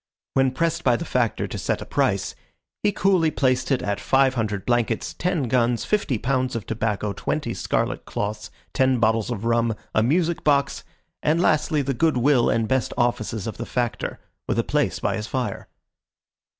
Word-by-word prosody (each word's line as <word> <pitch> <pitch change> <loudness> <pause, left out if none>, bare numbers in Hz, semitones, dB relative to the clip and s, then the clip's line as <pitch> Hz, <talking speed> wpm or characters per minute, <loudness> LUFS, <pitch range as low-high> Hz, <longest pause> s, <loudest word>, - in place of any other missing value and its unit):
When 135 0 +3
pressed 165 +5 -1
by 125 -2 +4
the 170 - -4
Factor 120 -6 0
to - - -6
set - - -1
a - - -7
price, - - 0 0.5
he 210 - +2
coolly 190 -5 +3
placed 130 -4 +1
it 135 - +1
at 100 0 -1
five 135 0 +3
hundred 105 -5 -2
blankets, 120 -2 0
ten 175 -4 -1
guns, 120 -1 +1
fifty 205 - 0
pounds 130 +2 -1
of 110 -4 -4
tobacco, 105 -2 -2
twenty 145 -2 -2
scarlet 95 - -1
cloths, 105 +1 -4 0.2
ten 130 -1 +2
bottles 110 0 +2
of 115 -3 -4
rum, 115 -1 +2 0.2
a 110 - +3
music 165 +8 +1
box, 140 -2 +2 0.4
and 155 +2 +2
lastly 155 -3 +2
the 135 +1 -1
good 155 +2 +2
will 125 -1 +3
and 115 -1 +1
best 130 +1 0
offices 115 -4 0
of 115 - -5
the 115 - -4
Factor, 120 -2 -2 0.3
with - - 0
a - - +2
place - - 0
by - - -1
his 105 - -4
fire. 130 -2 -3
125 Hz, 180 wpm, -23 LUFS, 115-145 Hz, 0.5 s, by